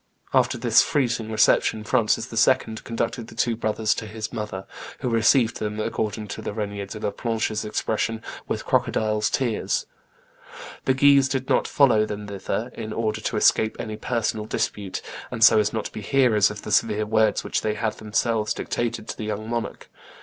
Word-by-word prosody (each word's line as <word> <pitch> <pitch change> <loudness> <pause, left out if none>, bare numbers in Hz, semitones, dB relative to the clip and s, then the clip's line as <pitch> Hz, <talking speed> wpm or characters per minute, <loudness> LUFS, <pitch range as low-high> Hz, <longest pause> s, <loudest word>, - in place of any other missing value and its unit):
After - - +3
this - - +5
freezing 115 -6 0
reception, 110 0 +3
Francis 110 -1 +1
II. 110 - +3
conducted 115 0 -3
the - - -13
two 120 -2 +1
brothers 110 -1 0
to 110 - -6
his 110 0 -6
mother, 105 -3 -5 0.4
who 125 - -1
received 115 +1 +3
them, 105 0 -3
according 110 -1 -2
to - - -5
Regnier 100 -1 -4
de 110 - -7
la 105 - -2
Planche's 110 -1 -2
expression, 110 +1 -2 0.2
'with - - -3
crocodile's 110 -1 +1
tears.' 120 -5 -1 1.0
The 130 - +3
Guises 140 0 +5
did 130 -1 -2
not - - +2
follow 115 -7 +4
them 105 0 -5
thither, 100 +4 -3
in 110 -1 -6
order 110 -1 -1
to 110 - -2
escape 110 +1 +3
any 110 - -5
personal 110 -2 -2
dispute, 100 -3 -3 0.3
and 115 -2 -1
so 110 -1 +8
as 105 0 +1
not 110 -2 -3
to - - -5
be - - -7
hearers 115 -2 +3
of 105 -1 -8
the - - -6
severe 105 -1 +2
words 110 0 +2
which - - -1
they 105 -1 -1
had 110 0 -1
themselves 110 0 0
dictated 115 -2 -3
to - - -4
the 110 - -5
young 105 0 -4
monarch. 120 0 -4
110 Hz, 180 wpm, -24 LUFS, 105-115 Hz, 1.0 s, so